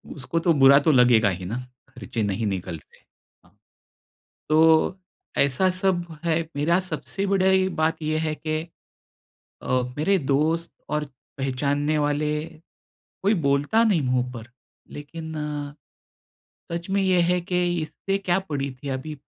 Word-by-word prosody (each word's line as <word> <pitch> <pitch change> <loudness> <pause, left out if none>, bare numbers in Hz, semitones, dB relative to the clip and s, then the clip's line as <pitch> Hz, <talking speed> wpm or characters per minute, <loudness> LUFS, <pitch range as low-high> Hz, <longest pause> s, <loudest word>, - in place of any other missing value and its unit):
उसको 150 +4 -2
तो 165 0 +3
बुरा 140 0 +7
तो 155 +2 +3
लगेगा 120 -5 +5
ही 90 -1 -5
ना 115 +6 -3 0.3
ख़र्चे 115 -3 -4
नहीं 105 +2 -1
निकल 90 -3 -3
रहे। - - -22 0.4
हाँ। 95 +4 -27 0.9
तो 160 +4 +4 0.4
ऐसा 140 +7 +3
सब 185 -1 0 0.2
है 165 0 +2 0.2
मेरा 170 +5 +2
सबसे 195 +1 -4
बड़ी 190 -1 +3
बात 160 +1 +1
ये 155 0 0
है 155 -1 -1
कि, 155 0 -2 1.0
अ, 130 -1 +1 0.2
मेरे 195 +5 +3
दोस्त 155 +4 0 0.2
और 150 0 -1 0.3
पहचानने 145 +3 0
वाले, 150 +1 0 0.9
कोई 205 +3 +4
बोलता 145 +12 +3
नहीं 195 -9 +3
मुँह 125 -1 0
पर, 120 0 -10 0.4
लेकिन 160 +2 -8 1.4
सच 170 +2 -4
में 195 0 +1
ये 185 -2 +3
है 180 0 +2
कि 180 0 -1 0.2
इसे 195 +5 -3
क्या 190 -2 0
पड़ी 140 -2 -2
थी 140 - -5
अभी 135 +4 -4
155 Hz, 140 wpm, -24 LUFS, 130-175 Hz, 1.4 s, बुरा